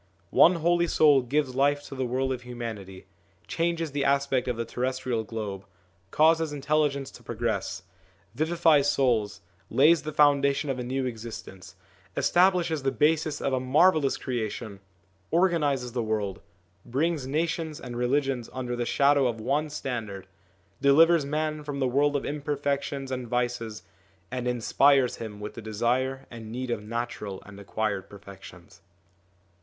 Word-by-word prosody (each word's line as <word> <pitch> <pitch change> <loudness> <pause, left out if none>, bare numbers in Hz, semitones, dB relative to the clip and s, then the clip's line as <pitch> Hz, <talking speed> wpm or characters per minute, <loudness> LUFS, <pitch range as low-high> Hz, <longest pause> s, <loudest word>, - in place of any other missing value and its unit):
One 180 - +6
Holy 170 +1 +2
Soul 150 -4 +5
gives 135 +1 -1
life 145 +2 +2
to 145 - -10
the 130 -2 -2
world 130 +2 0
of 125 - -6
humanity, 115 -6 -7 0.4
changes 165 -2 -1
the 140 0 -1
aspect 140 -2 +1
of 125 -2 -1
the 115 - -2
terrestrial 125 -2 -2
globe, 105 -3 -5 0.5
causes 160 +3 +3
intelli 150 +1 +1
gence 140 -1 -7
to - - -13
progress, 110 -5 -3 0.5
vivifies 155 0 +3
souls, 110 -6 +1 0.3
lays 160 +5 +5
the 155 - -5
founda 140 -2 +4
tion 140 0 -2
of 130 - -4
a - - -3
new 130 +2 -2
existence, 110 -5 -8 0.4
establishes 175 -4 +3
the 135 0 0
basis 150 +3 +1
of 135 - -1
a 130 - +2
marvellous 145 +3 +3
creation, 110 -4 -4 0.5
organises 150 -8 +1
the 120 0 -2
world, 105 -4 -2 0.4
brings 145 +3 -1
nations 160 +1 -2
and 125 -5 -8
religions 130 0 0
under 125 -2 -3
the 120 -1 -2
shadow 140 -1 +3
of 115 -2 -3
one 140 +7 0
standard, 110 -9 -5 0.6
delivers 160 +3 +5
man 155 +1 -2
from 145 -1 -5
the 130 - +1
world 145 +3 +2
of 140 - -1
imperfections 140 -2 -2
and 125 -2 -4
vices, 120 -2 -2 0.5
and 125 -1 -3
inspires 125 +2 +3
him 105 -2 -7
with 105 0 -6
the 115 - -8
desire 120 +5 -1
and 115 -2 -9
need 125 +1 -4
of 105 - -2
natural 105 -3 -5
and 100 -1 -12
acquired 100 -1 -3
perfections. 95 -3 -13
130 Hz, 150 wpm, -27 LUFS, 115-145 Hz, 0.6 s, One